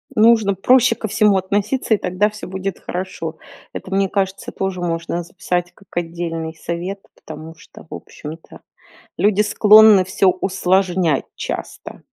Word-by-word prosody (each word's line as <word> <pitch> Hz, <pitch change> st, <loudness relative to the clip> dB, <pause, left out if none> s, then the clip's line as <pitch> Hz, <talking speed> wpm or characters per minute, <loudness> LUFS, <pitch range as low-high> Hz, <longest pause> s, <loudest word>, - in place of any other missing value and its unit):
Нужно 220 Hz, -3 st, +4 dB
проще 250 Hz, +4 st, +4 dB
ко 220 Hz, -, -5 dB
всему 210 Hz, -2 st, +3 dB
относиться, 205 Hz, +6 st, 0 dB
и -, -, +3 dB
тогда 190 Hz, +4 st, 0 dB
всё 210 Hz, 0 st, -9 dB
будет 190 Hz, 0 st, -5 dB
хорошо. 175 Hz, -3 st, -5 dB, 0.4 s
Это, 185 Hz, -, -8 dB
мне 195 Hz, -1 st, +1 dB
кажется, 195 Hz, -1 st, -2 dB
тоже 190 Hz, -2 st, -3 dB
можно 170 Hz, 0 st, -2 dB
записать 175 Hz, -1 st, -3 dB
как 195 Hz, -, -22 dB
отдельный 165 Hz, -1 st, -4 dB
совет, 175 Hz, +5 st, -5 dB, 0.2 s
потому 155 Hz, +1 st, -10 dB
что, 165 Hz, -, -16 dB
в -, -, -9 dB
общем-то, 155 Hz, +2 st, -10 dB, 0.6 s
люди 205 Hz, +2 st, +3 dB
склонны 210 Hz, -1 st, +6 dB
всё 190 Hz, +1 st, +2 dB
усложнять 185 Hz, -3 st, +1 dB
часто. -, -, -7 dB
190 Hz, 140 wpm, -19 LUFS, 175-205 Hz, 0.6 s, склонны